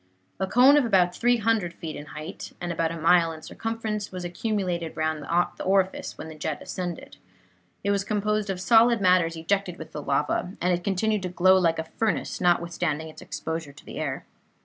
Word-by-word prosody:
A 190 - 0
cone 255 +7 +6
of 290 - +4
about 185 -6 +3
300 225 -6 +1
feet 160 -2 -6
in 145 - -8
height, 155 +6 -8
and 175 0 -3
about 165 -1 0
a 165 - -5
mile 165 +1 +4
in 160 -1 -10
circumference, 220 -2 -4
was 180 -1 -5
accumulated 175 -4 -2
round 155 -1 -1
the 170 +4 0
orifice 190 0 0
whence - - -7
the 155 - -15
jet 150 -1 -2
ascended. 175 -3 -6 0.7
It 200 - +1
was 200 -1 +1
composed 210 0 -1
of 190 -2 -2
solid 230 +3 +5
matters 180 -3 +3
ejected 180 +2 -1
with 160 - -9
the 150 - -5
lava, 145 +6 0
and 180 +1 +2
it 175 0 -2
continued 205 +2 0
to 185 - -3
glow 185 +1 +5
like 170 -3 +3
a 160 - -1
furnace, 215 +6 -2
notwithstanding 170 -3 0
its 155 - -12
exposure 160 -3 -5
to 145 - -16
the - - -7
air. 145 -4 -3
180 Hz, 195 wpm, -26 LUFS, 165-200 Hz, 0.7 s, cone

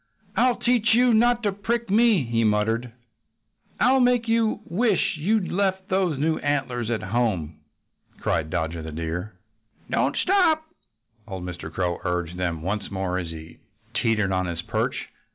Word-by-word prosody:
"I'll 250 0 +3
teach 235 -2 +2
you 245 0 +4
not 240 +2 +3
to 205 - +2
prick 225 +2 -2
me!" 220 - +4
he 115 -1 0
muttered. 110 +3 +1 0.9
"I'll 265 +2 +4
make 245 -2 +3
you 225 -1 +1
wish 205 +2 +1
you'd 195 +4 0
left 190 0 0
those 185 -6 +1
new 155 +3 +1
antlers 130 -5 -1
at 115 -2 -1
home!" 95 -8 -1 0.6
cried 80 -1 -1
Dodger 80 0 -2
the 80 0 -7
Deer. 85 +6 -4 0.6
"Don't - - +1
stop!" 355 -5 +3 0.6
old 95 -4 -6
Mr. 90 -3 -6
Crow 90 0 -1
urged 90 -1 -2
them 85 -3 -2
once 100 +3 -2
more 95 -2 -2
as 90 - -4
he 80 0 -10 0.3
teetered 105 -4 +1
on 95 -1 0
his 85 -1 -4
perch. - - -1
120 Hz, 155 wpm, -24 LUFS, -, 0.9 s, you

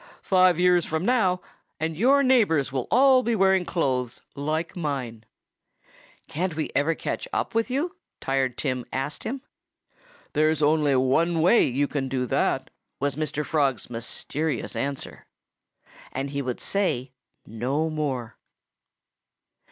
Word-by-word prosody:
"Five 185 -2 +4
years 180 -1 +4
from 160 +3 -2
now 190 -7 +2 0.4
and 160 0 -2
your 270 - +4
neighbors 210 - +3
will 130 -2 -2
all 260 +1 +6
be 235 -2 0
wearing 190 -2 +3
clothes 130 -9 -1
like 155 +4 -2
mine." 130 -9 -4 1.0
"Can't 175 +1 -2
we 155 - -3
ever 160 +3 +2
catch - - -4
up - - -2
with 225 +2 +1
you?" 310 +9 -1 0.2
Tired 135 -2 -1
Tim 130 -3 -2
asked 135 +2 -3
him. 260 +3 -4 0.9
"There's 155 0 +2
only 150 -2 +3
one 160 +7 +2
way 180 +9 +5
you 140 +3 0
can 135 -2 -3
do 130 -1 -1
that," - - 0 0.3
was 140 -1 -1
Mr. 150 0 -2
Frog's 135 -8 0
mysterious 140 +6 -3
answer. 140 -1 -4 0.8
And 135 +1 -3
he 140 0 -2
would 125 -2 -3
say 140 -11 -1 0.3
no 130 +8 -1
more. 130 -7 -3
155 Hz, 135 wpm, -25 LUFS, 135-180 Hz, 1.0 s, all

